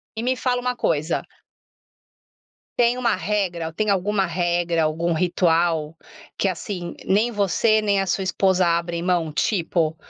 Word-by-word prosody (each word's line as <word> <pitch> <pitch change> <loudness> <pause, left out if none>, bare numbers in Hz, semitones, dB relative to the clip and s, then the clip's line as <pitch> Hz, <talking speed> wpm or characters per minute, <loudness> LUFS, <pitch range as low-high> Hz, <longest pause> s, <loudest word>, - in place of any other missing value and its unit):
E 220 - -3
me 255 +1 +1
fala 250 -1 0
uma 250 0 -1
coisa 155 -7 -1 1.5
Tem 240 +1 +3
uma 240 -2 +1
regra 180 -3 -2
ou 160 - -8
tem 215 +4 -1
alguma 195 +1 +1
regra, 175 -1 0
algum 165 +2 0
ritual 165 -2 +1 0.4
que, 195 - +1
assim, 180 -2 -4
nem 215 +5 +2
você 215 +2 +2
nem 200 -2 +1
a 195 - -3
sua 190 - 0
esposa 190 0 +2
abrem 170 0 0
mão? 175 -3 0
Tipo, 165 -3 0
180 Hz, 150 wpm, -22 LUFS, 170-210 Hz, 1.5 s, Tem